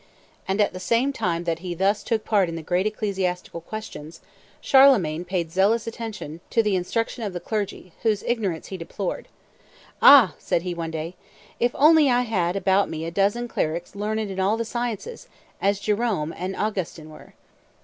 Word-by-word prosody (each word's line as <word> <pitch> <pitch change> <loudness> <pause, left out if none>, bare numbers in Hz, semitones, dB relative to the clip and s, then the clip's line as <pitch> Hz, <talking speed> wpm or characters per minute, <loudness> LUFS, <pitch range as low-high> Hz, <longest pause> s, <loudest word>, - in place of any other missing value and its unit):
And 195 +2 -1
at 205 - +2
the 185 - -6
same 235 +8 +1
time 170 -8 -1
that 165 -1 -2
he 175 0 -5
thus 195 +4 +1
took 220 -2 -2
part 200 -5 +2
in 165 - -5
the 165 - -6
great 180 +5 +1
ecclesiastical 190 -5 -3
questions, 165 -5 -8 0.4
Charlemagne 215 - +5
paid 175 -3 -3
zealous 205 +5 +2
attention 220 -9 -6
to 230 - +2
the 210 -2 +1
instruction 225 +6 -2
of 200 -3 -3
the 175 - -4
clergy, 200 -4 -4
whose 215 -3 +1
ignorance 200 -9 -2
he 190 - -5
deplored. 180 +2 -5 0.7
"Ah," 265 - +8
said 170 - -1
he 180 -1 -3
one 165 -1 -4
day, 160 +1 -5 0.5
"if 240 +1 +1
only 305 0 +6
I 245 0 +3
had 185 -7 0
about 195 0 +2
me 160 0 -4
a 165 - -4
dozen 205 +6 +1
clerics 170 -5 -3
learned 215 +2 -2
in 190 - -5
all 200 +4 +2
the 230 - -2
sciences, 240 - -4 0.3
as 200 0 +1
Jerome 205 -7 -1
and 185 +1 -4
Augustin 180 -7 -3
were!" - - -15
195 Hz, 180 wpm, -24 LUFS, 175-225 Hz, 0.7 s, Ah